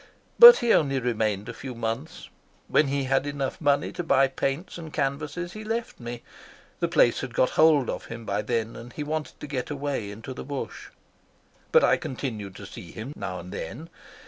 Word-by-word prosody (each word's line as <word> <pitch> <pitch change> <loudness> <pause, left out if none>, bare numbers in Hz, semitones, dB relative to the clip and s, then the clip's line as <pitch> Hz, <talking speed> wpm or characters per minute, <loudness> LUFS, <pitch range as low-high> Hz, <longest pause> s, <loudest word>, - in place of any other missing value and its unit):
But 480 0 +12
he 230 - +5
only 135 -3 +2
remained 110 -4 -1
a - - -5
few 130 -2 -7
months. 115 +6 -4 0.4
When 155 - +3
he 140 0 0
had 135 +2 +1
enough 140 0 -3
money 145 -1 +2
to 175 - -4
buy 135 -4 +4
paints 135 +7 -3
and 160 -2 -8
canvases 150 +5 -2
he 215 - -7
left 225 +2 -3
me. 120 0 -7 0.6
The 170 - +1
place 155 -8 +3
had 125 -2 -6
got 130 - +3
hold 155 -5 +5
of - - -4
him 115 0 -8
by 100 0 -1
then, 115 +1 -2
and 120 +1 -10
he 150 - -5
wanted 155 +1 -4
to - - -6
get 140 -3 -4
away 140 -7 -3
into 115 +6 -8
the - - -7
bush. 140 0 -6 0.8
But - - +6
I - - +4
continued 110 -7 -5
to 100 - -9
see 90 -2 -10
him 115 +6 -7
now 95 -2 -5
and 90 +1 -10
then. 145 - -7
135 Hz, 200 wpm, -26 LUFS, 115-150 Hz, 0.8 s, But